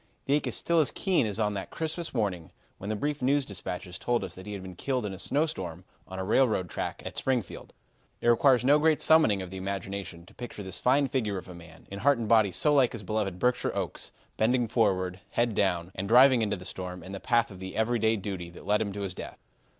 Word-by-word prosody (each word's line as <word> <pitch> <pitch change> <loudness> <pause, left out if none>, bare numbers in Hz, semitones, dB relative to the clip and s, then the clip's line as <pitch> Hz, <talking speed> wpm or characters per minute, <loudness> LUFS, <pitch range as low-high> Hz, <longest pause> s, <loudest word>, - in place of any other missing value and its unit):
The 140 - +1
ache 150 - +1
is - - -1
still 170 -1 +2
as 155 - +3
keen 180 - +1
as 105 +1 -3
on 105 -1 +1
that 100 -1 -5
Christmas 165 +1 -4
morning 95 - -2 0.3
when 100 - -6
the 110 - 0
brief 145 +6 -2
news 140 +2 +2
dispatches 90 -3 -6
told 120 -3 0
us 95 -2 -5
that 95 +2 -11
he 105 - -5
had 100 -2 -6
been 95 -1 -9
killed 130 +4 -2
in 100 - -4
a 95 - -8
snowstorm 95 - -2 0.2
on 95 - -8
a 95 - -2
railroad 105 -3 +2
track - - -4
at - - -6
Springfield. 125 -8 -2 0.5
It - - -2
requires 125 +1 +5
no 145 +3 +6
great 155 0 +3
summoning 110 -12 +4
of 90 - -9
the 95 - -6
imagination 95 -2 -5
to - - -18
picture 120 -4 -7
this 95 -1 -5
fine 135 +3 +3
figure 110 -8 -1
of - - -8
a 90 - -9
man, 80 -1 -14
in 100 - -5
heart 140 +4 +4
and 115 -2 -3
body 110 -3 +4
so 150 - +2
like 135 -4 +4
his 115 -3 -7
beloved 100 -2 -2
Berkshire 125 +5 0
oaks, - - -4 0.3
bending 120 +2 +2
forward, 95 -5 +1
head 120 -1 +1
down, 90 -3 0
and 95 +1 -4
driving 125 +2 +7
into 105 -2 0
the 90 - -11
storm 90 -2 -6
in 95 - -9
the 100 - -5
path 115 0 +1
of 95 - -10
the 95 0 -7
everyday 110 0 +2
duty 95 -4 -5
that 85 - -13
led 105 0 +2 0.2
to 100 - -4
his 95 -2 -3
death. - - -8
105 Hz, 240 wpm, -28 LUFS, 95-125 Hz, 0.5 s, driving